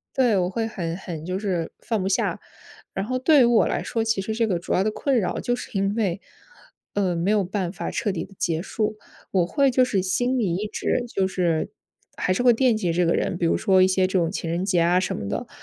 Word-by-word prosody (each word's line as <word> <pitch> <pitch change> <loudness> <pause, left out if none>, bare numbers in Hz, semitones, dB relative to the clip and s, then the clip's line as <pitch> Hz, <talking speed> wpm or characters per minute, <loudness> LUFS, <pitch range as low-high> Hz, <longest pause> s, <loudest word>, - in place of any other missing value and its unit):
对， 245 -6 +3
我 180 0 +1
会 225 +3 -2
很 170 -6 -4
很 165 -5 -7
就 185 +2 -2
是 180 -6 -2
放 225 -4 -2
不 190 - -1
下。 - - 0 0.5
然 195 - -2
后 255 +2 -1
对 280 +1 +5
于 - - +6
我 235 -1 +4
来 - - -1
说， 225 -2 -2
其 220 -3 0
实 220 +3 -3
这 230 +1 +1
个 180 -5 0
主 175 - -3
要 185 - +3
的 215 - 0
困 270 +3 0
扰 190 - -1
就 245 - 0
是 - - -8
因 195 +2 0
为， 195 -4 0 0.8
呃， 190 -3 +1
没 170 +5 0
有 210 -2 +3
办 185 -2 -2
法 170 -3 -5
彻 205 - -1
底 185 - -4
地 195 - -18
结 165 -2 -1
束。 215 +2 -2 0.3
我 180 -3 +2
会 275 - +2
就 255 0 +4
是 200 -6 0
心 245 +8 0
里 195 -8 0
一 210 +2 -3
直 240 +3 -1
就 195 -5 0
是 175 -4 0 0.5
还 185 - +1
是 245 - -1
会 250 - +7
惦 240 0 +3
记 180 -6 -1
这 175 +1 +2
个 165 - +2
人， 175 - -1
比 175 - 0
如 165 - +2
说 190 -3 +3
一 185 - +6
些 185 0 +2
这 185 0 +1
种 165 - +1
情 170 -3 -4
人 175 +3 -1
节 180 -4 +2
啊 175 +2 +3
什 185 - -2
么 100 - -5
的， - - -3
195 Hz, 275 characters per minute, -24 LUFS, 180-225 Hz, 0.8 s, 会